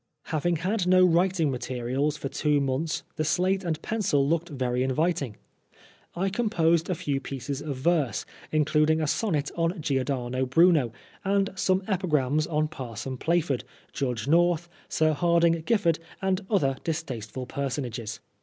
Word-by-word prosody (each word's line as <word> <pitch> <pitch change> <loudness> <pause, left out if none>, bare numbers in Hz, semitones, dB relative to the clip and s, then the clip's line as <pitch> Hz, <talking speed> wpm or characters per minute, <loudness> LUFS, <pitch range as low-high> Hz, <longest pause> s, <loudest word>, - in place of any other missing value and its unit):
Having 170 +3 +1
had 185 +3 -1
no 185 0 +6
writing 175 -3 +2
materials 130 +3 -2
for 140 - -4
two 150 +1 +1
months 140 +4 -1
the 155 - +1
slate 185 +5 +1
and 165 -3 -2
pencil 175 -11 +1
looked 170 +3 0
very 125 -4 -1
inviting. 140 -2 0 0.8
I 190 +3 0
composed 175 -7 +1
a 180 - +1
few 140 -3 -1
pieces 135 +1 -5
of 145 -3 -4
verse, 140 - +1 0.3
including 155 +1 +3
a 155 - 0
sonnet 150 -3 0
on 165 +2 0
Giordano 130 -3 -1
Bruno 155 -3 +4 0.3
aQd 195 0 0
some 190 0 +2
epigrams 155 -7 +1
on 155 -1 +1
Parson 130 -3 -6
Plaford, 160 -2 0 0.3
Judge 125 -3 -2
North, 170 +1 +3 0.2
Sir 155 0 +2
Hardinge 170 0 +3
Giffard, 180 -9 +2 0.2
and 190 0 0
other 140 -10 +2
distasteful 130 -7 -4
personages. 125 -4 -4
155 Hz, 140 wpm, -27 LUFS, 135-175 Hz, 0.8 s, no